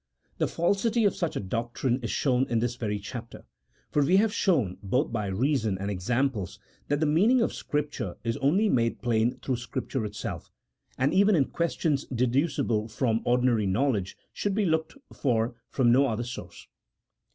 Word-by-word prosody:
The - - +2
falsity 205 +7 +1
of 200 - +2
such 170 -3 -2
a - - -1
doctrine 120 +5 -1
is 115 - -3
shown 130 -1 +1
in 115 - +1
this 120 +1 0
very 105 -4 -2
chap 115 +3 -7
ter, - - -12 0.5
for 145 - +2
we 180 +7 +4
have 210 +1 +3
shown 135 - +1
both 125 +9 0
by 105 -3 -2
reason 110 0 0
and 100 +2 -3
examples 105 +1 -1 0.3
that 145 0 0
the 155 - +2
meaning 200 +12 +4
of 230 - +1
Scripture 145 -10 -3
is 115 -1 -1
only 180 +11 +2
made 115 - +1
plain 115 0 +1
through 130 -2 -1
Scrip 120 -1 -5
ture 130 -5 -1
itself, 105 -1 -6 0.5
and 130 +2 +1
even 200 +2 +5
in 140 -5 +3
questions 160 -3 -1
deducible 125 -2 0
from 115 0 0
ordinary 120 -4 +2
knowledge 100 -2 0 0.2
should 200 -2 -1
be 210 -1 +2
looked 160 - 0 0.2
for 120 -3 0 0.2
from 125 -3 +3
no 135 +3 +5
other 115 -1 -2
source. 120 +1 -8
125 Hz, 175 wpm, -27 LUFS, 115-150 Hz, 0.5 s, even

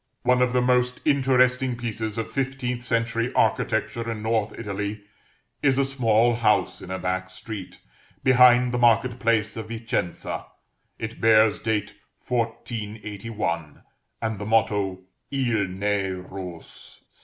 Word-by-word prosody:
One 125 0 +3
of 125 0 +3
the 125 0 +2
most 125 0 +2
interesting 130 -3 +3
pieces 110 -2 -4
of 115 - -3
fifteenth 130 -2 -2
century 115 0 0
architecture 115 0 +1
in 110 -1 -5
North 110 -2 0
Italy, 105 -1 -4 0.6
is 135 -2 +3
a 140 - +3
small 120 -3 +3
house 105 -3 +2
in 90 - -9
a 95 - -2
back 95 0 -2
street, 95 0 -8 0.4
behind 125 -1 +6
the 125 - -1
market 120 +1 +3
place 110 -3 +1
of 110 -1 -6
Vicenza; 115 -5 -3 0.5
it 110 +1 -6
bears 110 -1 +5
date 105 -2 -1 0.3
1481, 105 - -3 0.4
and 110 -3 -2
the 105 - -4
motto, 100 -4 +1 0.3
_Il. 120 -8 0
n'est. 100 0 -1
rose. 90 -2 -9
115 Hz, 130 wpm, -25 LUFS, 105-125 Hz, 0.6 s, behind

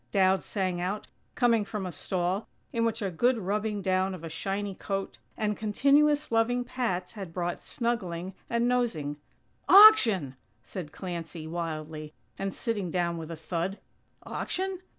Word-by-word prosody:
Dowd 190 -1 +3
sang 185 -3 -1
out, 195 +4 -2 0.3
coming 235 -3 +3
from 205 -1 -4
a 180 - -4
stall, 180 +5 -2 0.3
in 230 0 +1
which 225 -2 -1
a 195 - -1
good 240 +8 +2
rubbing 210 0 -1
down 185 0 +1
of 170 - -11
a 165 - -5
shiny 195 +5 -3
coat, 195 0 -4 0.2
and 210 -1 0
continuous 285 +8 +3
loving 235 +2 +2
pats 225 -8 -2
had 195 -6 -7
brought 175 0 -2
snuggling 190 -7 -2 0.2
and 235 +1 +1
nosing. 200 -13 0 0.5
"Auction!!" 225 - +8 0.3
said 155 +4 -7
Clancy, 170 -3 -6
wildly, 155 -2 -5 0.2
and 195 0 -3
sitting 210 -6 -2
down 170 -1 0
with 160 0 -7
a 165 - -4
thud. 170 +4 -3 0.5
"Auction? 375 0 -3
195 Hz, 150 wpm, -28 LUFS, 175-230 Hz, 0.5 s, Auction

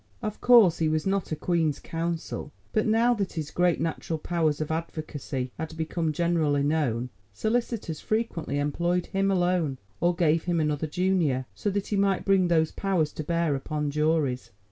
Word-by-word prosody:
Of 215 -1 -4
course, 230 -9 +6
he 160 -1 +2
was 155 0 0
not 195 -2 -1
a - - 0
Queen's 160 -2 0
Counsel, 165 -2 -4 0.2
but 215 - +2
now 230 +3 +4
that 200 -5 -2
his 155 -2 -4
great 180 -1 +2
natural 165 0 -2
powers 155 -2 0
of 155 0 -2
advocacy 155 -5 -4
had 160 0 -5
become 160 0 -1
generally 155 -3 +1
known, 130 -5 0 0.2
solicitors 220 - -1
frequently 215 -9 -2
employed 170 +5 0
him 195 0 0
alone, 175 -6 +1 0.2
or 175 0 +2
gave 165 -1 +2
him 175 -2 +1
another 150 0 0
junior, 170 -6 +1
so 205 - -2
that 200 0 -1
he 205 - 0
might 195 -1 +1
bring 195 -2 +4
those 160 -2 +2
powers 180 -6 0
to 155 - -5
bear 170 -1 +1
upon 150 +1 -2
juries. 150 -4 0
165 Hz, 170 wpm, -27 LUFS, 150-185 Hz, 0.2 s, course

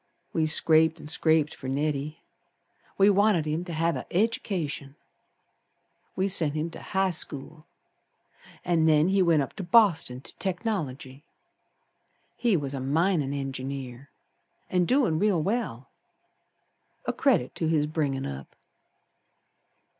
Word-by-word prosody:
We 160 -1 +1
scraped 160 +1 +3
an' 150 - -9
scraped 160 -1 +2
fer 130 - -9
Neddy, 145 +2 -2 0.7
We 200 +1 +6
wanted 200 -5 +3
him 155 +3 -2
to 175 - -6
have 165 +1 0
a - - -7
education. 175 -9 -1 1.2
We 190 - 0
sent 165 -6 +2
him 160 +2 -2
to - - -10
High 190 0 0
School, 155 -1 -3 1.0
An' 165 -2 +2
then 155 +2 +4
he 195 0 +3
went 165 -5 +3
up - - -8
to 195 - -4
Boston 175 - +3
to - - -10
Technology. 155 - -4 1.1
He 230 -6 +2
was 140 -2 -4
a 135 - -3
minin' 150 +2 +1
engineer, 135 -1 -5 0.6
An' 180 -1 +2
doin' 245 - +2
real 200 -3 +2
well, 160 - -3 1.1
A - - -1
credit 125 - +1
to 165 - -1
his 155 -2 +2
bringin' 145 -3 -2
up. 70 0 -8
160 Hz, 130 wpm, -27 LUFS, 140-185 Hz, 1.2 s, We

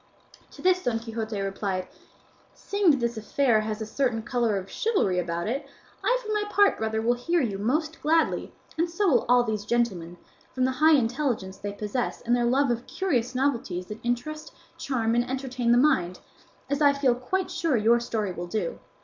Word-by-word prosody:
To - - -12
this 365 0 +3
Don 240 -2 0
Quixote 225 -2 -4
replied, 195 -1 -2 0.7
"Seeing 400 -3 +1
that 280 -3 +4
this 235 -1 -1
affair 220 +1 +2
has 215 0 -3
a - - -5
certain 225 0 -1
colour 235 -4 0
of 190 0 -5
chivalry 200 - 0
about 170 0 -2
it, 265 +5 -3 0.4
I - - +3
for 430 -3 -4
my 420 0 +1
part, 410 -1 +3
brother, 220 0 -1
will 240 +1 +3
hear 335 +9 0
you 210 -9 -1
most 305 +9 -1
gladly, 320 +2 +1 0.3
and 340 +1 +2
so 385 +4 0
will 260 -9 +3
all 245 0 +6
these 215 -3 -2
gentlemen, 200 -7 -1 0.4
from 255 -1 +2
the 260 - +1
high 310 +5 +5
intelligence 240 -6 -1
they 205 - -4
possess 210 +4 -3
and 240 0 +1
their 240 -1 +1
love 265 +2 +2
of 235 +1 -3
curious 255 -10 -1
novelties 235 -9 -1
that 210 +1 -6
interest, 305 +7 -3 0.2
charm, 230 -5 -1
and 240 +1 +1
entertain 255 -2 -1
the 240 - +5
mind, 185 -11 +2 0.5
as 285 +2 -1
I 285 -1 +6
feel 280 -3 +2
quite 305 +10 -2
sure 315 -7 +1
your 230 +2 +4
story 220 -4 -2
will 175 0 -6
do. 220 - -3
240 Hz, 190 wpm, -26 LUFS, 215-285 Hz, 0.7 s, all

